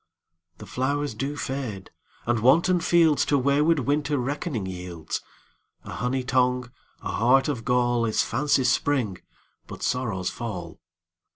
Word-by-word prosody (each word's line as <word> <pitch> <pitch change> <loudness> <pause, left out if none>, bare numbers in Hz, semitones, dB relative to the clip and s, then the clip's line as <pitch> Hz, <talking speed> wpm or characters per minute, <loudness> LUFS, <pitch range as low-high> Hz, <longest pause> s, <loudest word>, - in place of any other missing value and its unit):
The 105 - -10
flowers 140 +8 -1
do 140 +2 -3
fade, 130 -9 -4 0.3
and 120 -1 +1
wanton 170 +10 +4
fieldsTo 160 -4 +3
wayward 145 +4 +3
Winter 145 +2 0
reckoning 130 - -2
yields:A 90 -3 -8
honey 125 +1 -1
tongue, 125 -1 +1 0.3
a - - -3
heart 130 +5 +3
of 130 -6 -2
gall, 120 0 +2
Is 110 - +1
fancy's 135 -3 +2
spring, 125 -10 0 0.5
but - - -8
sorrow's 110 -8 -1
fall. 90 -8 -6
125 Hz, 120 wpm, -25 LUFS, 115-145 Hz, 0.5 s, wanton